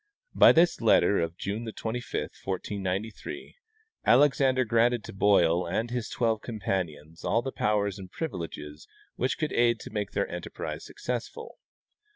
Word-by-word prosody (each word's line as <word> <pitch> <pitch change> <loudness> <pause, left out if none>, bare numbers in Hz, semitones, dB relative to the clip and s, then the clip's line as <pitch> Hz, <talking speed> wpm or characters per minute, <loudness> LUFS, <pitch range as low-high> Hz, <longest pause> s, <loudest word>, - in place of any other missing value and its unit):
By - - +8
this 170 +2 +3
letter 105 -2 +4
of 85 +1 -2
June 110 +3 -4
25, 120 +3 -3 0.2
1493, 95 +2 -4 0.5
Alexander 130 0 +4
granted 115 +1 +2
to - - -9
Boil 90 -4 +3
and 115 +7 -2
his 120 -2 -3
twelve 115 -2 0
companions 85 -8 -4
all 115 +2 +1
the 135 - -3
powers 105 -3 0
and 95 -1 -9
privileges 80 - -6 0.3
which 130 - -1
could 155 - -2
aid 120 -1 +3
to - - -9
make 105 -2 -3
their - - 0
enterprise - - -6
successful. - - -6
105 Hz, 140 wpm, -28 LUFS, 95-120 Hz, 0.5 s, By